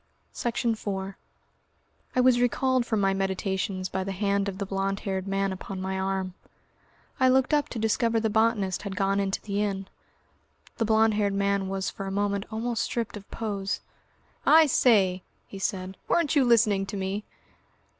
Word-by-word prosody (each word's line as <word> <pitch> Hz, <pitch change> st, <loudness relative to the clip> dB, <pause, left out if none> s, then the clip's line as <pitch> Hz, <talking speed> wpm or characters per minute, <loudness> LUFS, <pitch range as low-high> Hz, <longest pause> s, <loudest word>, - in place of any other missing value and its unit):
Section 235 Hz, -1 st, -1 dB
4 195 Hz, -2 st, -4 dB, 1.0 s
I 255 Hz, -, +4 dB
was 250 Hz, -1 st, +4 dB
recalled 255 Hz, 0 st, +1 dB
from 220 Hz, -2 st, +1 dB
my 195 Hz, 0 st, +3 dB
meditations 190 Hz, 0 st, -2 dB
by 190 Hz, +1 st, -2 dB
the 195 Hz, -, -4 dB
hand 200 Hz, +1 st, 0 dB
of 190 Hz, -, -7 dB
the 200 Hz, -, -3 dB
blond 195 Hz, 0 st, -2 dB
haired 190 Hz, -1 st, -3 dB
man 195 Hz, 0 st, 0 dB
upon 190 Hz, +1 st, -7 dB
my 190 Hz, 0 st, -2 dB
arm. 190 Hz, -1 st, -2 dB, 0.9 s
I 260 Hz, 0 st, +5 dB
looked 260 Hz, +3 st, +3 dB
up 295 Hz, -1 st, +2 dB
to -, -, -6 dB
discover 225 Hz, +1 st, +1 dB
the 220 Hz, -, +1 dB
botanist 220 Hz, -3 st, +1 dB
had 200 Hz, -2 st, -5 dB
gone 195 Hz, +1 st, +1 dB
into 195 Hz, -1 st, -1 dB
the 200 Hz, -1 st, -2 dB
inn. 195 Hz, -2 st, -2 dB, 0.9 s
The 225 Hz, -, +1 dB
blond 220 Hz, 0 st, +4 dB
haired 205 Hz, -1 st, +1 dB
man 200 Hz, -1 st, +1 dB
was 195 Hz, 0 st, -2 dB
for 195 Hz, -, -6 dB
a -, -, -3 dB
moment 200 Hz, 0 st, -1 dB
almost 230 Hz, +1 st, -2 dB
stripped 230 Hz, -1 st, -2 dB
of 205 Hz, -1 st, -10 dB
pose. 200 Hz, -3 st, -3 dB, 0.6 s
"I 320 Hz, 0 st, +7 dB
say," 200 Hz, -9 st, +3 dB, 0.2 s
he 195 Hz, -, -9 dB
said. 190 Hz, -1 st, -3 dB
"Weren't 325 Hz, -3 st, +2 dB
you 275 Hz, -3 st, +5 dB
listening 210 Hz, -5 st, +3 dB
to 200 Hz, -, -5 dB
me?" 195 Hz, +2 st, -2 dB
200 Hz, 175 wpm, -27 LUFS, 195-225 Hz, 1.0 s, I